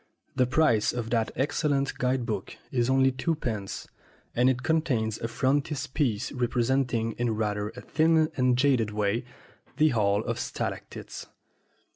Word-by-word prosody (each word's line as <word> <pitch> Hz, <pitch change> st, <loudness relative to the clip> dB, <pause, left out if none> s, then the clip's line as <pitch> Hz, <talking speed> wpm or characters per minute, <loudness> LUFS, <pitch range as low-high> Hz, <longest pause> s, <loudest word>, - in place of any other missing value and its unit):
The 130 Hz, -2 st, +3 dB
price 125 Hz, -6 st, +3 dB
of 120 Hz, -2 st, -4 dB
that 115 Hz, -2 st, +1 dB
excellent 140 Hz, 0 st, 0 dB
guide 125 Hz, -1 st, +1 dB
book -, -, -4 dB, 0.2 s
is 120 Hz, -1 st, +1 dB
only 135 Hz, 0 st, +4 dB
two 130 Hz, +6 st, -1 dB
pence, 110 Hz, -9 st, -4 dB, 0.5 s
and 125 Hz, +2 st, +4 dB
it 125 Hz, -1 st, -1 dB
contains 125 Hz, -10 st, 0 dB
a 115 Hz, -, -2 dB
frontispiece 135 Hz, -2 st, 0 dB
representing, 120 Hz, -1 st, 0 dB
in 120 Hz, -2 st, +1 dB
rather 105 Hz, -1 st, -1 dB
a -, -, -8 dB
thin 160 Hz, 0 st, +2 dB
and 125 Hz, -1 st, +2 dB
jaded 125 Hz, -5 st, +3 dB
way, 105 Hz, +2 st, -1 dB, 0.5 s
the 155 Hz, +1 st, +5 dB
Hall 105 Hz, -3 st, +2 dB
of -, -, -3 dB
Stalactites. -, -, -5 dB
125 Hz, 140 wpm, -27 LUFS, 115-140 Hz, 0.5 s, the